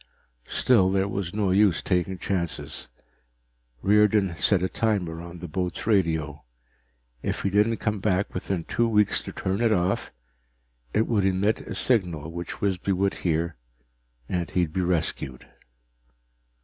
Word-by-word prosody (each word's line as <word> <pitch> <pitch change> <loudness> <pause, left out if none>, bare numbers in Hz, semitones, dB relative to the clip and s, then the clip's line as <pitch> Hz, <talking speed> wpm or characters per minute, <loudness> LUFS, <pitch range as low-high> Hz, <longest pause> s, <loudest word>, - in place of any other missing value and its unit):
Still, 100 -7 +4
there 95 0 +1
was 95 -3 -3
no 100 -2 0
use 95 -4 +3
taking 90 0 0
chances. 85 -2 -3 1.0
Riordan 105 -2 +4
set 90 +3 +2
a - - +2
timer 95 -7 -1
on 85 0 -9
the 90 +1 -7
boat's 90 +2 -3
radio. 80 -8 +1 0.8
If - - -2
he 100 - 0
didn't 105 +3 +3
come 105 -1 -1
back 95 -1 0
within 90 -1 -2
two 120 +7 +1
weeks 105 -2 +2
to - - -7
turn 95 +3 -2
it 115 -2 +3
off, 90 -2 0 0.8
it 110 - +2
would 105 -4 +1
emit 95 +3 +1
a - - -7
signal 85 - 0
which 85 +1 -6
Wisby 100 -1 0
would 95 +1 +1
hear, 85 -3 0 0.7
and 90 -2 -2
he'd 85 -4 0
be 95 - 0
rescued. 80 -7 -2
95 Hz, 145 wpm, -26 LUFS, 85-105 Hz, 1.0 s, Still